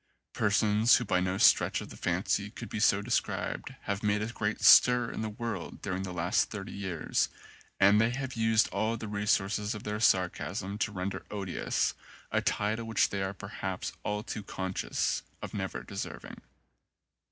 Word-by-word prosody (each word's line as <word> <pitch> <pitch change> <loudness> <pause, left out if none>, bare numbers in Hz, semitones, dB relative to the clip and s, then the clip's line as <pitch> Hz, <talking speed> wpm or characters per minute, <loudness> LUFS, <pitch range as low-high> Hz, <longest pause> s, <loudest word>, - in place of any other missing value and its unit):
Persons 110 0 +4
who 125 - -3
by 90 - +2
no 90 +1 -1
stretch - - +5
of - - -8
the - - -10
fancy 95 +3 -1
could 115 +2 -9
be - - -4
so 100 -2 +3
described 120 +3 -2
have 100 0 -2
made 105 0 +1
a 115 +3 -4
great 105 -1 -2
stir 125 -1 +7
in - - -5
the 110 - -2
world 115 +2 -5
during 95 -1 -2
the 95 -1 -4
last 90 +4 +1
thirty 100 -3 -6
years 95 -5 -1 0.5
and 100 +2 +6
they 115 - +3
have 130 +1 -4
used 115 -1 +3
all 115 +1 -1
the 110 - -6
resources 105 +1 0
of 105 - -8
their 105 0 -3
sarcasm 95 0 0
to 110 - 0
render 95 0 -4
odious 100 -4 -1 0.4
a - - +2
title 110 +3 -1
which 115 -2 +2
they 100 - -2
are 95 +1 -2
perhaps - - -5
all 105 0 -2
too 110 - -5
conscious 95 -1 -2 0.2
of - - -7
never - - -4
de - - -10
serving. - - -6
105 Hz, 175 wpm, -30 LUFS, 95-110 Hz, 0.5 s, stir